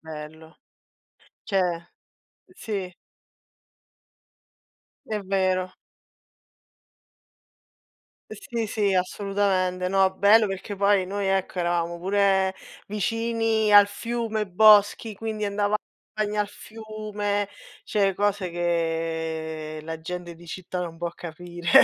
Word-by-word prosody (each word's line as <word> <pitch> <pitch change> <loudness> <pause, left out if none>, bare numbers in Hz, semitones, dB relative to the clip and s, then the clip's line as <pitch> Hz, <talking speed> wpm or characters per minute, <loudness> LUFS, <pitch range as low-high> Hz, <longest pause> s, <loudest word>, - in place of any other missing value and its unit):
bello. 160 0 -10 0.9
Cioè, 180 -4 -1 0.6
sì. 210 - -5 2.2
È 215 -4 -2
vero. 185 -1 0 2.6
Sì, 225 +2 -4
sì, 205 -2 +1
assolutamente. 185 -1 0
No, 190 0 +4
bello 210 +3 +6
perché 195 +1 -5
poi 200 -1 +3
noi 200 +2 -3
ecco, 190 -1 0
eravamo 170 -1 0
pure 190 0 +2 0.3
vicini 225 0 0
al 205 0 +9
fiume, 225 0 -3
boschi, 210 +3 +5
quindi 215 0 -4
andava 205 +1 +1 0.4
bagno 210 0 0
al 205 - -1
fiume, 210 -2 -4 0.4
cioè 195 -2 +1
cose 200 -1 0
che 160 -2 -2
la 160 +1 -6
gente 175 +1 -6
di 170 +1 -15
città 180 +1 -5
non 170 -2 -5
può 170 +1 -3
capire. 175 +1 -8
195 Hz, 95 wpm, -25 LUFS, 175-210 Hz, 2.6 s, al